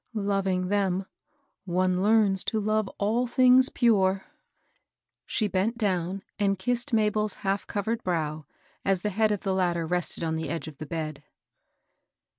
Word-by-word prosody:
Loving 195 -3 0
them, 195 -2 0 0.6
one 185 0 +1
learns 205 -2 +3
to 220 - 0
love 215 0 0
all 225 +5 +1
things 255 +1 +5
pure." 195 -5 +2 1.0
She 215 - 0
bent 200 +4 0
down 190 -3 -1 0.2
and 195 -1 +2
kissed 245 +6 -1
MabeFs 215 -1 +1
hali^overed 205 +3 -2
brow, 155 -4 -2 0.4
as 195 -2 +1
the 210 - -1
head 215 +2 +2
of 205 - -1
the 195 - -1
latter 175 -3 0
rested 175 0 -2
on 160 -1 -1
the 160 - -4
edge 165 -1 -4
of 150 -3 -10
the 155 - -6
bed. 155 -2 -4
195 Hz, 145 wpm, -27 LUFS, 180-215 Hz, 1.0 s, things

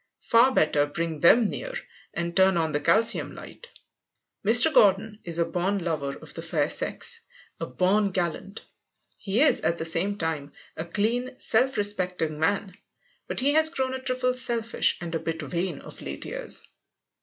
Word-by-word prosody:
Far 235 +3 +6
better 150 - +2
bring 165 +1 -4
them 220 +8 +5
near - - -6 0.4
and 170 0 -4
turn 190 -1 +4
on 160 -1 0
the 145 - -1
calcium 195 +10 +1
light. 485 - -12 0.8
Mr. 240 +9 +6
Gordon 210 0 +3
is 170 -1 -2
a 170 - +2
born 180 +4 -1
lover 155 -6 -3
of - - -12
the - - -6
fair - - -1
sex, - - -1 0.4
a - - -4
born 190 +9 +1
gallant. 185 +1 -4 0.6
He 205 +5 -1
is, 310 - +4
at 170 - 0
the 160 - -4
same 185 +5 0
time, 155 -5 -4 0.2
a 160 - -5
clean, 235 +8 -2
self 260 +4 +1
respecting 180 -6 0
man. 190 +3 -1 0.5
But - - -1
he 280 +2 +2
has 315 +1 +5
grown 265 -5 -2
a 260 - -5
trifle 255 -1 -1
selfish 235 -2 0
and 170 -1 -6
a 165 - -1
bit 165 0 -4
vain 180 +1 -3
of - - -13
late - - -7
years. - - -2
195 Hz, 170 wpm, -26 LUFS, 165-235 Hz, 0.8 s, Far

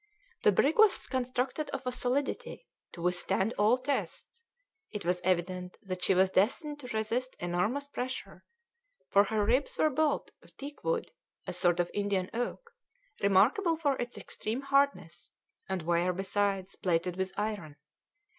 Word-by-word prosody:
The - - +5
brig 280 - +2
was 430 -3 +6
constructed 255 +3 -2
of 265 -1 -5
a 250 - 0
solidity 255 - -2 0.3
to 170 - -8
withstand 180 +4 +1
all 215 +4 +5
tests; 280 - -3 0.5
it 210 -4 -6
was 180 0 +1
evident 180 0 -1
that 185 -2 -5
she 190 - +3
was 190 +1 +4
destined 290 - +1
to 255 - -8
resist 235 +4 -1
enormous 190 +11 -1
pressure, 255 -2 -5 0.7
for 200 +1 +6
her 210 0 0
ribs 255 +6 +1
were 310 - +3
built 300 +2 +1
of - - -22
teak 285 +1 -8
wood, 485 -1 -1 0.3
a - - -4
sort 175 -1 +2
of 175 - 0
Indian 200 -2 -1
oak, 245 - -3 0.5
remarkable 225 - +4
for 295 -4 +1
its 240 0 -5
extreme 225 +5 -4
hardness, 275 - +1 0.4
and 190 -3 -2
were, 170 +2 +2
besides, 195 0 -1
plated 175 0 0
with 190 0 -2
iron. 205 -8 -3
215 Hz, 150 wpm, -31 LUFS, 185-275 Hz, 0.7 s, was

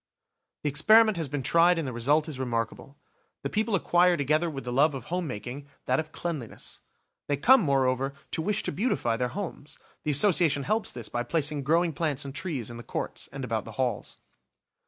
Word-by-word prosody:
The 150 - +1
experiment 215 +9 +5
has 160 -4 -2
been 140 -1 -3
tried 170 +5 +4
and 160 -4 -2
the 130 - -4
result 145 +7 +2
is 145 -5 -6
remarkable. 120 +2 -3 0.5
The 140 - -3
people 215 0 +1
acquire 175 -1 +3
together 155 +4 +1
with 135 -3 -6
the 125 - -4
love 145 +3 +3
of 130 - -6
homemaking, 140 - -5 0.2
that 130 +3 +2
of 155 0 -4
cleanliness. 155 -11 -6 0.5
They 145 - 0
come, 260 - +6
moreover, 135 - +1 0.2
to - - -1
wish 210 +4 -1
to - - -2
beautify 145 - 0
their 125 +1 0
homes. 170 -7 -6 0.3
The 150 - -2
Association 155 -2 +3
helps 215 +8 0
this 120 -3 -7
by 120 - -2
placing 150 +1 0
growing 165 +2 +2
plants 145 -2 -1
and 135 - -6
trees 140 - -4
in 120 - -8
the 120 - -9
courts - - -4
and - - -6
about - - -2
the - - -10
halls. - - -2
150 Hz, 195 wpm, -27 LUFS, 130-170 Hz, 0.5 s, come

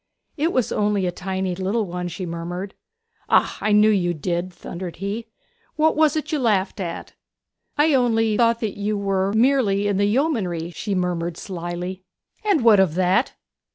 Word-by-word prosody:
'It 320 +3 0
was 255 -7 0
only 205 -2 +1
a 180 - 0
tiny 190 +1 -3
little 195 +5 -1
one,' 180 -1 -4
she 180 +2 -5
murmured. 175 +3 -5 0.6
'Ah - - +3
I 215 - +1
knew 210 +1 +6
you 175 -4 +1
did!' 175 +3 -2
thundered 175 0 -7
he. 205 +5 -4 0.5
'Now 305 - 0
what 315 - +4
was 310 -1 +3
it 305 -1 -3
you 305 - 0
laughed 210 -4 +1
at?' 170 -3 -5 0.6
'I 300 +1 +4
only 225 -4 +2
thought 230 0 +2
that 210 -3 -3
you 205 +1 -1
were 195 -1 0
merely 220 -4 +2
in 200 -2 0
the 200 - +3
yeomanry,' 205 - 0
she 200 +3 -3
murmured 175 -2 -2
slily. 180 0 -5 0.4
'And 400 - +2
what 220 -4 +6
of 185 -5 +3
that?' 185 +7 +2
200 Hz, 175 wpm, -22 LUFS, 180-230 Hz, 0.6 s, knew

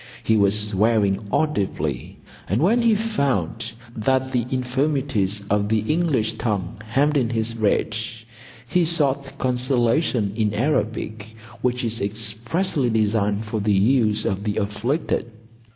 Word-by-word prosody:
He 110 - +2
was 100 0 +4
swearing 105 -1 +1
audibly, 95 - -1 0.3
and 100 +6 +1
when 220 +10 +3
he 230 -2 +4
found 140 - -1 0.2
that 130 +3 0
the 120 -2 0
infirmities 130 -6 -1
of 105 0 +1
the 110 -1 +2
English 135 -10 0
tongue 105 -2 -2
hemmed 140 +7 +1
in 125 -4 +1
his 115 0 -1
rage, 110 +1 -1 0.4
he 180 +7 +2
sought 140 -4 +1
consolation 125 -3 +1
in 105 -2 0
Arabic, 110 -4 -2 0.3
which 125 +1 0
is 115 0 -2
expressly 115 - -1
designed 105 -1 +1
for 110 0 -3
the 105 0 +1
use 110 +1 +2
of 95 +1 -1
the 105 -1 -2
afflicted. 115 +6 -1
115 Hz, 130 wpm, -22 LUFS, 105-135 Hz, 0.4 s, was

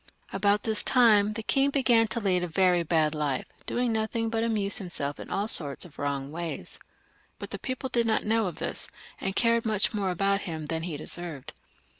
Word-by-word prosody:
At - - -4
about 205 +1 +2
this 220 -2 +2
time 215 -5 +4
the 225 0 -5
king 275 +5 +2
began 245 -5 +3
to 215 +3 -3
lead 190 -4 +1
a 180 - -2
very 180 +1 +2
bad 160 -2 +1
life, 145 -4 -2 0.2
doing 245 -1 0
nothiag 220 +1 -1
but 225 0 0
amuse 215 -1 0
himself 155 -7 -4
in - - -9
all 200 +2 -1
sorts 145 - +5
of 170 - -15
wrong 140 -1 -3
ways. 170 0 -6 0.6
But - - -7
the - - -4
people 255 0 -4
did 235 -2 0
not 220 - 0
know 220 -1 +1
of 175 - -5
this, - - -5 0.3
and 195 0 -3
cared 230 -1 +2
much 215 -1 +1
more 200 -3 -1
about 195 +2 0
him 160 -4 -5
than 160 +2 -3
he 165 -3 -4
deserved. 160 -2 -6
200 Hz, 205 wpm, -27 LUFS, 165-225 Hz, 0.6 s, sorts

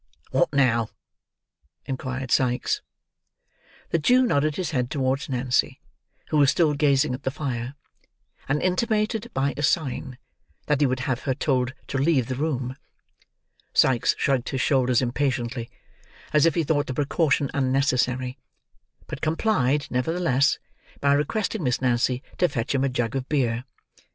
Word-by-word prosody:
"What - - +2
now?" 120 -6 +2 1.0
inquired 130 -1 -4
Sikes. 125 -1 +1 1.1
The 165 - +2
Jew 250 +11 +4
nodded 150 -7 +1
his 180 -2 -2
head 125 -4 -1
towards 135 0 -1
Nancy, 125 -1 0 0.5
who 155 - +1
was 140 -2 +5
still 155 -1 +3
gazing 140 -1 +2
at 130 - -5
the - - -1
fire; 130 -2 -4 0.7
and 145 +2 +1
intimated, 215 +4 0
by 140 +1 +1
a - - -4
sign, 135 -4 -1 0.5
that 150 -1 +1
he 145 - +5
would 130 0 -1
have 130 -3 -1
her 130 - 0
told 130 -2 0
to 135 - -3
leave 135 -4 +2
the 130 - -1
room. 130 -3 -2 1.0
Sikes 125 -3 +3
shrugged 135 -3 0
his 135 - -2
shoulders 130 -3 +2
impatiently, 120 -2 -1 0.6
as 150 +1 +5
if 165 - +1
he 170 - +2
thought 145 -1 0
the 130 - -4
precaution 145 -1 +1
unnecessary; 130 -1 0 0.7
but - - -7
complied, 155 - +1
nevertheless, 140 0 +1 0.4
by 140 0 +3
requesting 200 +8 -1
Miss 125 -5 0
Nancy 125 0 +1 0.2
to 180 - +4
fetch 120 -4 -2
him 135 -1 +1
a 135 - +2
jug 120 -1 -2
of 135 -1 -3
beer. 125 -4 0
135 Hz, 145 wpm, -25 LUFS, 125-150 Hz, 1.1 s, was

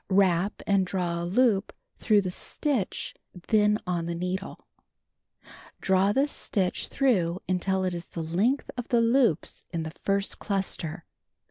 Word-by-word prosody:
Wrap 190 0 +2
and 200 -1 +3
draw 180 -2 -2
a - - -2
loop 210 +1 +2 0.3
through 210 -1 +4
the 185 -2 -3
stitch 255 - -2 0.4
then 210 -1 +4
on 175 -2 -1
the 170 - -2
needle. 180 +3 -3 1.2
Draw 190 +1 +3
this 280 +4 +1
stitch 185 -3 -1
through 185 -11 +1
mitil 185 +1 0
it 180 - -2
is 170 0 -5
the 165 - -5
length 200 - 0
of 245 -1 -5
the 240 - +3
loops 230 - +2
in 165 -2 -2
the 160 0 -6
first 200 0 0
cluster. 190 -4 -2
190 Hz, 145 wpm, -27 LUFS, 175-210 Hz, 1.2 s, through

